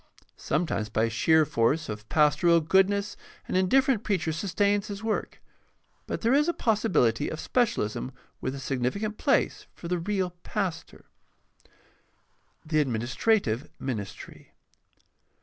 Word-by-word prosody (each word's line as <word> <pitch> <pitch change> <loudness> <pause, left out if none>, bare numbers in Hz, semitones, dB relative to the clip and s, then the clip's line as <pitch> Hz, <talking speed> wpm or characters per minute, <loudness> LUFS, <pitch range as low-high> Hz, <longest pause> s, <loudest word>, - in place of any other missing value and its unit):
Sometimes 115 -11 -1
by 110 +2 +1
sheer 160 +7 +3
force 140 +6 +1
of 105 0 -7
pastoral 155 +3 +4
goodness 195 +5 +2 0.3
an - - -3
indifferent 235 +5 +3
preacher 180 -6 0
sustains 200 +4 0
his 205 0 -7
work; 220 -1 -3 0.6
but - - -4
there 235 +2 +2
is 295 +3 +4
a 345 - +1
possibility 185 - +1
of 155 - -5
specialism 130 - -1 0.3
with 130 +1 -3
a - - -6
significant 135 - -2
place - - +1
for 170 - -8
the 180 0 -1
real 185 0 -1
pastor. 195 -5 -4 1.6
The 155 0 +1
administrative 130 - 0
ministry. 110 -7 -7
170 Hz, 120 wpm, -27 LUFS, 130-205 Hz, 1.6 s, pastoral